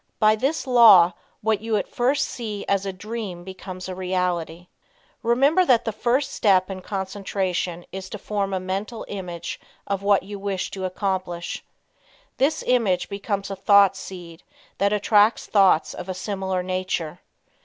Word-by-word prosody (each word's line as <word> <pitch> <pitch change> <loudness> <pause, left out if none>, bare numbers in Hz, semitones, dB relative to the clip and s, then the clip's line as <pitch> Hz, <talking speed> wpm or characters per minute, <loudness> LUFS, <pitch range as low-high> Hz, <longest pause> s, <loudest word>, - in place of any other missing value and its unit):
By 215 0 +4
this 270 +8 -1
law 215 -9 +7 0.3
what 220 -1 +1
you 220 -1 0
at - - -2
first 255 +4 +1
see 215 -4 -5
as 200 0 +1
a - - -1
dream 200 -2 -6
becomes 185 0 -8
a 185 - -4
reality. 180 -2 -2 0.6
Remember 275 +9 +3
that 245 -8 +3
the 225 - 0
first 250 +6 0
step 190 -2 +3
in 185 -1 -6
concentration 190 -3 -3
is 190 0 -7
to - - -6
form 200 -1 -2
a 190 - -1
Mental 195 +5 -4
Image 180 -4 -6 0.3
of 200 -1 -2
what 200 -1 +3
you 200 +1 -8
wish 195 -2 -3
to 190 -1 -4
accomplish. 185 -2 -3 0.7
This 295 +4 +1
image 220 -8 +1
becomes 200 0 -3
a - - -3
thought 200 0 +5
seed 175 -3 -9 0.4
that 200 +1 +2
attracts 210 +1 +3
thoughts 190 -6 +3
of 180 - -8
a 185 - -3
similar 190 -2 -2
nature. 185 -3 -3
195 Hz, 155 wpm, -23 LUFS, 185-215 Hz, 0.7 s, law